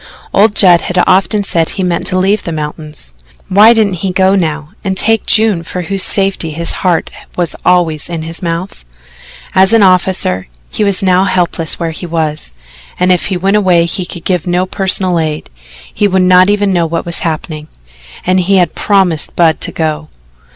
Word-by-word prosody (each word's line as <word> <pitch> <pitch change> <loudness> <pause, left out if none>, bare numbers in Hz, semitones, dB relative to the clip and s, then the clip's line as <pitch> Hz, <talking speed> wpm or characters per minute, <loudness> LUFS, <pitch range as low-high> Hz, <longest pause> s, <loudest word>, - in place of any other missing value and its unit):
Old 210 +1 +3
Judd 175 -3 +5
had 180 0 -2
often 195 +2 +2
said 165 -4 -1
he 190 - -4
meant 180 -2 -1
to 185 - 0
leave 195 +3 +1
the 170 - -5
mountains 150 - -6 0.4
why 210 +4 +6
didn't 205 -7 +1
he 195 - -1
go 190 +1 +2
now 155 -5 -2
and 190 -1 -2
take 225 +2 0
June 215 -5 +2
for 180 +2 -6
whose 195 +2 0
safety 195 -4 0
his 170 +2 -1
heart 175 -3 0 0.3
was 175 -3 -2
always 165 -4 +1
in 165 -2 -4
his 165 +1 -7
mouth? 170 - -5 0.7
As 190 +3 +3
an 225 -2 +5
officer, 185 - +1 0.2
he - - -2
was 200 -1 +1
now 185 0 +3
helpless 170 -4 0
where 165 -1 -2
he 175 +2 -7
was; 155 - -3 0.4
and 180 0 +2
if 180 - +1
he 190 - -2
went 195 +3 +1
away 180 -4 +2
he 175 +1 -4
could 170 - -9
give 180 0 -1
no 180 +1 0
personal 185 -2 +1
aid 155 - -4 0.4
he 205 - +1
would 190 -1 +1
not 185 +1 +5
even 205 -1 +1
know 170 -2 +1
what 165 +1 -3
was 170 0 0
happening 155 -1 -4 0.6
and 185 +1 +2
he 190 +2 +1
had 180 -2 +2
promised 190 -6 0
Budd 165 -2 +2
to - - -3
go. 155 -1 -3
180 Hz, 190 wpm, -12 LUFS, 165-190 Hz, 0.7 s, why